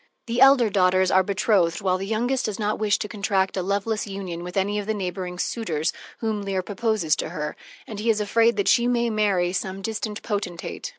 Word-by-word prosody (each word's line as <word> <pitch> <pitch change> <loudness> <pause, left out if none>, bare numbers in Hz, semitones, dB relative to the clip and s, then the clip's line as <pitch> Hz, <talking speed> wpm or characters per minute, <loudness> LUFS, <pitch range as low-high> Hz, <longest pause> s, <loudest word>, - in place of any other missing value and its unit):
The 235 +1 -1
elder 270 -5 +6
daughters 185 -1 +3
are 190 - +5
betrothed, 190 -3 +1
while 185 -2 0
the 195 - -4
youngest 245 +5 0
does 210 - -3
not 210 -1 -1
wish 210 -1 +2
to - - -4
contract 200 -2 0
a 190 - 0
loveless 205 +3 -1
union 190 -4 -5
with 180 +2 -6
any 205 +2 +1
of 205 - -6
the 220 - 0
neighboring 180 -2 -4
suitors 170 -7 -1 0.3
whom 220 -2 -1
Leir 195 -2 -2
proposes 205 -5 0
to - - -3
her, 150 -3 -4 0.3
and 215 -2 -7
he 225 +2 -1
is 215 -1 +3
afraid 230 +3 +2
that 200 -1 0
she 235 +4 +4
may 240 -1 +1
marry 195 -5 +1
some 190 +1 -3
distant 220 -1 -4
potentate. 200 - -4
200 Hz, 210 wpm, -24 LUFS, 185-220 Hz, 0.3 s, elder